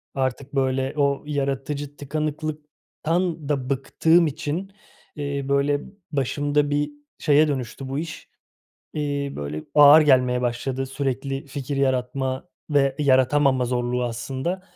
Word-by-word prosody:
Artık, 135 Hz, +1 st, -2 dB
böyle, 130 Hz, 0 st, +1 dB
o 140 Hz, 0 st, +1 dB
yaratıcı 140 Hz, 0 st, -3 dB
tıkanıklıktan 155 Hz, +2 st, -3 dB
da 135 Hz, -3 st, -1 dB
bıktığım 160 Hz, +5 st, +3 dB
için, 160 Hz, +6 st, -4 dB, 0.4 s
eee, 140 Hz, -2 st, -3 dB
böyle, 140 Hz, +1 st, +2 dB, 0.3 s
başımda 145 Hz, +1 st, +1 dB
bir 145 Hz, +1 st, 0 dB, 0.3 s
şeye 150 Hz, 0 st, +4 dB
dönüştü 130 Hz, -1 st, -4 dB
bu 135 Hz, +2 st, -2 dB
iş. 160 Hz, -1 st, -7 dB, 0.6 s
Eee, 145 Hz, -2 st, -2 dB
böyle, 75 Hz, +2 st, -5 dB
ağır 150 Hz, +1 st, +9 dB
gelmeye 125 Hz, -3 st, +4 dB
başladı 125 Hz, +2 st, -2 dB
sürekli 135 Hz, 0 st, -3 dB
fikir 140 Hz, 0 st, -4 dB
yaratma 130 Hz, +2 st, -1 dB, 0.2 s
ve 140 Hz, -2 st, +2 dB
yaratamama 130 Hz, -1 st, +3 dB
zorluğu 125 Hz, 0 st, -1 dB
aslında. 130 Hz, +10 st, -3 dB
140 Hz, 115 wpm, -24 LUFS, 130-150 Hz, 0.6 s, ağır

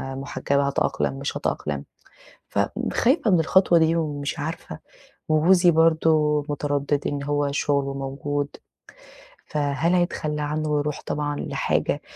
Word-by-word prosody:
محجبة 140 Hz, +1 st, -1 dB
هاتأقلم 140 Hz, -1 st, 0 dB
مش 140 Hz, -, -3 dB
هاتأقلم؟ 70 Hz, -1 st, -3 dB, 0.6 s
فخايفة 260 Hz, -1 st, +1 dB
من 180 Hz, -3 st, +4 dB
الخطوة 175 Hz, +1 st, +4 dB
دي 160 Hz, +1 st, +3 dB
ومش 150 Hz, -1 st, -2 dB
عارفة، 145 Hz, -, -5 dB, 0.5 s
وجوزي 175 Hz, +3 st, +5 dB
برضو 160 Hz, -2 st, +3 dB
متردد، 145 Hz, 0 st, -1 dB
إن 145 Hz, -1 st, -3 dB
هو 145 Hz, 0 st, 0 dB
شغله 140 Hz, -1 st, 0 dB
موجود 140 Hz, +1 st, -3 dB, 1.0 s
فهل 150 Hz, +3 st, 0 dB
هيتخلى 155 Hz, -4 st, -1 dB
عنّه 155 Hz, +1 st, -2 dB
ويروح 150 Hz, 0 st, -1 dB
طبعًا 145 Hz, 0 st, -2 dB
لحاجة -, -, -1 dB
145 Hz, 115 wpm, -24 LUFS, 140-160 Hz, 1.0 s, وجوزي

